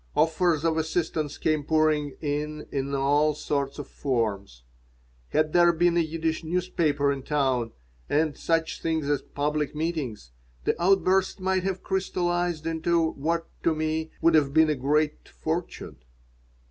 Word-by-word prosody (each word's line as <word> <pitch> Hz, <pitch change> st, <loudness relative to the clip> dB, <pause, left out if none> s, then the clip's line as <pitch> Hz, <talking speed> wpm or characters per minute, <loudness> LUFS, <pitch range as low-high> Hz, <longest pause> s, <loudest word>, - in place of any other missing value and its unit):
Offers 165 Hz, -1 st, +2 dB
of 160 Hz, -1 st, +2 dB
assistance 160 Hz, -2 st, -1 dB
came 155 Hz, -2 st, 0 dB
pouring 155 Hz, -2 st, +1 dB
in 150 Hz, +1 st, -3 dB
in 140 Hz, 0 st, -2 dB
all 145 Hz, +2 st, +2 dB
sorts 140 Hz, -2 st, -2 dB
of 145 Hz, -2 st, -6 dB
forms. 105 Hz, -, -2 dB, 0.7 s
Had 155 Hz, 0 st, +1 dB
there 175 Hz, -1 st, +6 dB
been 170 Hz, +1 st, +2 dB
a -, -, +4 dB
Yiddish 160 Hz, 0 st, -1 dB
newspaper 160 Hz, -4 st, 0 dB
in 140 Hz, -1 st, -3 dB
town 130 Hz, -5 st, 0 dB, 0.4 s
and 150 Hz, 0 st, +1 dB
such 165 Hz, -1 st, -1 dB
things 160 Hz, -3 st, -1 dB
as 145 Hz, -1 st, +1 dB
public 150 Hz, +1 st, -2 dB
meetings, 150 Hz, -, -3 dB, 0.3 s
the -, -, +2 dB
outburst 190 Hz, +1 st, +3 dB
might 190 Hz, 0 st, +1 dB
have 190 Hz, 0 st, -3 dB
crystallized 175 Hz, -3 st, -1 dB
into 165 Hz, 0 st, +1 dB
what, 165 Hz, +4 st, -1 dB, 0.2 s
to 165 Hz, -, +2 dB
me, 155 Hz, +1 st, -1 dB
would 165 Hz, 0 st, +5 dB
have 145 Hz, -2 st, +3 dB
been 160 Hz, -1 st, +5 dB
a -, -, 0 dB
great 150 Hz, +3 st, 0 dB
fortune. 170 Hz, +2 st, -4 dB
155 Hz, 145 wpm, -26 LUFS, 145-165 Hz, 0.7 s, there